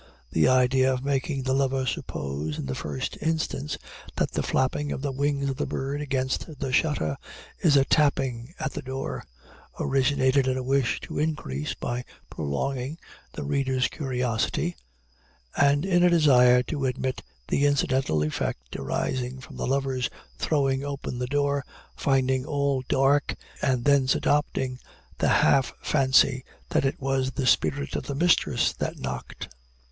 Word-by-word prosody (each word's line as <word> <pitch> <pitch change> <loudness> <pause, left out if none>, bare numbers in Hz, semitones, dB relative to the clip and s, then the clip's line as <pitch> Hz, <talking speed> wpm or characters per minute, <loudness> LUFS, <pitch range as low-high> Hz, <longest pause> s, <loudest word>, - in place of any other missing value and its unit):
The 80 - +3
idea 130 +1 +4
of 130 0 -2
making 140 0 -1
the 130 0 0
lover 135 -1 +1
suppose, 75 - -3
in - - -4
the 65 - -3
first 70 0 -4
instance, 155 -2 -1 0.4
that - - 0
the - - -1
flapping 145 +3 0
of 135 - -4
the 140 - -1
wings 140 +1 0
of 135 -1 -2
the 150 - -1
bird 140 +2 -3
against 135 +2 -2
the 130 - -2
shutter, 105 - +1 0.4
is 150 -4 +4
a 135 - +4
"tapping" 135 -2 +1
at 155 -2 -2
the - - -4
door, 130 - -4 0.6
originated 135 0 +2
in 130 0 +1
a 130 - -3
wish 135 -1 +1
to - - -5
increase, 110 - -2
by 120 +1 -3 0.3
prolonging, 130 - -3 0.4
the - - -5
reader's 130 - +1
curiosity, 125 +4 -1 0.8
and 145 +3 +3
in 180 -2 +3
a 180 - +6
desire 125 -7 +5
to 140 +2 -3
admit 130 +1 -2 0.3
the 145 +1 +3
incidental 130 - +1
effect 60 -5 -3
arising 125 - -2
from 130 - -12
the - - -3
lover's 135 -1 0 0.3
throwing 135 -3 +1
open 140 -3 -4
the 125 - -2
door, 140 0 +1 0.3
finding 130 -1 +1
all 140 -2 0
dark, 140 +2 +3 0.3
and 130 -3 +1
thence 140 -2 +4
adopting 130 -3 0 0.4
the - - +2 0.2
half 135 -3 +3
fancy 130 -2 +3 0.3
that - - +1
it 135 - -1
was 135 -1 0
the 130 - -2
spirit 140 +2 +1
of - - -3
his 140 - -3
mistress 175 +2 +3
that - - -4
knocked. 65 -1 -6
135 Hz, 150 wpm, -26 LUFS, 125-140 Hz, 0.8 s, a